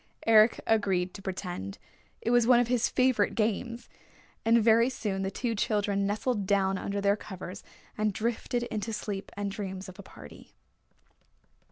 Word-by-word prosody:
Eric 220 0 +6
agreed 190 -5 +1
to - - -9
pretend. 180 - -5 0.4
It 230 - -1
was 240 -1 +4
one 245 -1 +6
of 245 -1 +1
his 245 -2 +2
favorite 255 -5 +2
games. 230 +2 -1 0.6
And 230 +1 +5
very 230 +2 +4
soon 205 -6 -3
the 190 - -1
two 230 +4 -2
children 205 -2 0
nestled 210 0 -1
down 195 -1 +2
under 200 0 -3
their 200 0 +3
covers 190 -2 -8 0.4
and 215 0 +2
drifted 235 +3 -2
into 220 -1 -4
sleep 205 -2 -5
and 200 -1 -2
dreams 195 -1 -5
of 185 +1 -12
a - - -5
party. 75 - -14
210 Hz, 160 wpm, -29 LUFS, 195-230 Hz, 0.6 s, Eric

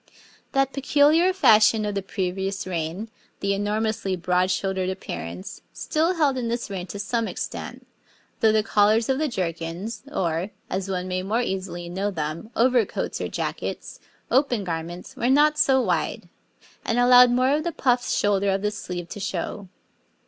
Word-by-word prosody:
That 270 0 +2
peculiar 295 +6 +4
fashion 220 - +5
of 205 - -2
the 200 - -1
previous 190 0 -3
reign 180 +4 -4 0.3
the 200 0 0
enormously 205 -1 -1
broad 180 +1 +1
shouldered 190 0 -1
appearance 90 - -6
still 330 +4 0
held 285 -5 +2
in 240 - -2
this 235 -2 -3
reign 185 -2 -4
to 200 - -7
some 225 +3 -1
extent, - - -6 0.5
though 220 - +4
the 215 0 +2
collars 215 +2 +3
of 265 +1 +1
the 310 - +1
jerkins, 175 - -4
or, 170 - -1 0.2
as 190 +1 -2
one 185 -1 -2
may 185 0 -2
more 220 +6 0
easily 185 -4 -4
know 190 +4 -2
them, 160 +3 -4
overcoats 245 -2 +1
or - - -1
jackets, - - -4 0.3
open 255 -5 +2
garments, 170 0 -5
were 240 - 0
not 300 +3 +4
so 265 -1 +4
wide, 175 -6 -1 0.6
and 230 - -1
allowed 245 0 +7
more 255 +2 +2
of 305 +1 0
the 340 - -1
puffed 250 -5 +1
shoulder 200 -1 +2
of 195 +1 0
the 210 - +1
sleeve 175 -4 -6
to 205 - -7
show. 195 +1 -4
205 Hz, 165 wpm, -24 LUFS, 185-245 Hz, 0.6 s, allowed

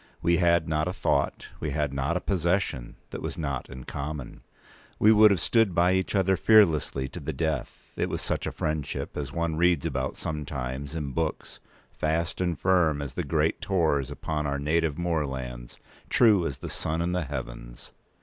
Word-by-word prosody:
We 85 0 +4
had 85 -1 +3
not 80 +1 0
a 90 - -2
thought, 70 -6 0
we 75 - -2
had 75 -1 -1
not 70 +6 0
a - - -4
possession, 90 -8 -1 0.2
that - - -6
was - - -4
not 70 -5 -3
in 65 -1 -8
common. 75 -1 -6 0.6
We 105 - +6
would 110 0 +8
have 100 -3 +2
stood 115 -4 +2
by 90 +2 +4
each 95 +2 0
other, 95 -1 +3
fearlessly, 80 -11 +4
to 90 - -7
the 80 0 -4
death. 80 -1 -3
It - - -1
was - - -2
such - - -2
a - - -2
friendship 75 -2 -3
as 70 -2 -4
one 85 +1 -1
reads 85 -3 +3
about 65 0 -2
sometimes 70 -1 -4
in 75 -4 -3
books: 80 +2 -3 0.3
fast 80 +2 -1
and 90 -3 0
firm 80 0 +3
as 70 -2 -5
the - - -2
great - - 0
Tors 80 -8 +1
upon 75 -2 -3
our 70 0 -1
native 75 +1 0
moorlands, 65 -8 -3 0.3
true 105 -8 +5
as 70 - -5
the - - -7
sun 80 +1 -2
in 85 - -1
the 90 -2 -1
heavens. - - -7
80 Hz, 185 wpm, -27 LUFS, 70-85 Hz, 0.6 s, would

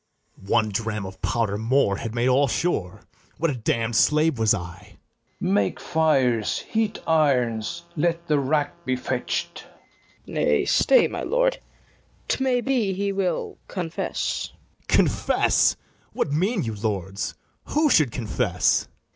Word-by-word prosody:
BARABAS. 95 - -16
One 110 -2 +3
dram 105 0 -3
of 95 0 -10
powder 105 -3 0
more 115 -3 +2
had 115 +1 -5
made 120 +1 +1
all 135 +2 +4
sure: 110 - -2 0.4
What 165 0 +1
a - - -3
damn'd 115 0 -1
slave 150 +2 +3
was 110 -1 +3
I! 115 - +4
[Aside.] 90 0 -9 0.5
FERNEZE. 95 - 0
Make 100 -1 +1
fires, 135 -9 +1
heat 220 -1 -1
irons, 140 -1 +1
let 170 +1 0
the 150 -3 +2
rack 145 +4 -1
be 130 -4 0
fetch'd. 125 - -3
FIRST - - -15 0.6
KNIGHT. - - -11
Nay, - - +2
stay, - - +4
my - - -5
lord; - - +1 0.7
't 265 - 0
may 250 -2 +2
be 240 -7 0
he 200 +1 -1
will 195 -2 -2
confess. 175 -4 -3
BARABAS. - - -6
Confess! - - +2 0.4
what - - -1
mean 190 +8 +1
you, 115 -2 -3
lords? 100 -2 -3 0.3
who 300 -1 +2
should 155 - +4
confess? 110 -4 0
135 Hz, 150 wpm, -24 LUFS, 110-170 Hz, 0.7 s, all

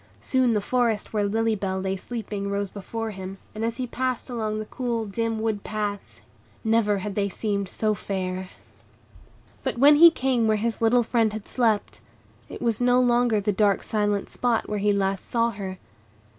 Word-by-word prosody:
Soon 255 -3 +2
the 210 - +1
forest 230 -2 0
where 210 -1 +1
Lily 225 +2 +1
Bell 190 -2 -2
lay 190 0 -1
sleeping 205 -1 -5
rose 200 -1 -2
before 225 +2 -5
him, 190 -1 -7 0.2
and 215 - -4
as 230 0 -1
he 255 - -2
passed 255 +1 -3
along 215 -3 -2
the 215 - -4
cool, 235 -1 -2
dim 225 +2 -2
wood 220 -2 -1
paths, 210 -2 -4 0.4
never 220 -2 +2
had 205 - -3
they 200 0 0
seemed 200 -1 -2
so 215 +2 0
fair. 185 -2 -4 1.1
But - - -2
when 290 +4 +7
he 335 +2 +10
came 255 -7 +1
where 215 0 +3
his 230 +2 -2
little 240 +2 +4
friend 225 -2 +2
had 215 -1 -6
slept, 225 -4 0 0.5
it - - -7
was 230 -1 0
no 245 0 +4
longer 240 -3 +3
the 205 +1 0
dark, 200 0 +2
silent 205 -2 -1
spot 240 -2 0
where 210 - -2
he 205 +1 +2
last 195 -1 -1
saw 235 0 +2
her. 195 -3 -6
215 Hz, 185 wpm, -25 LUFS, 200-235 Hz, 1.1 s, he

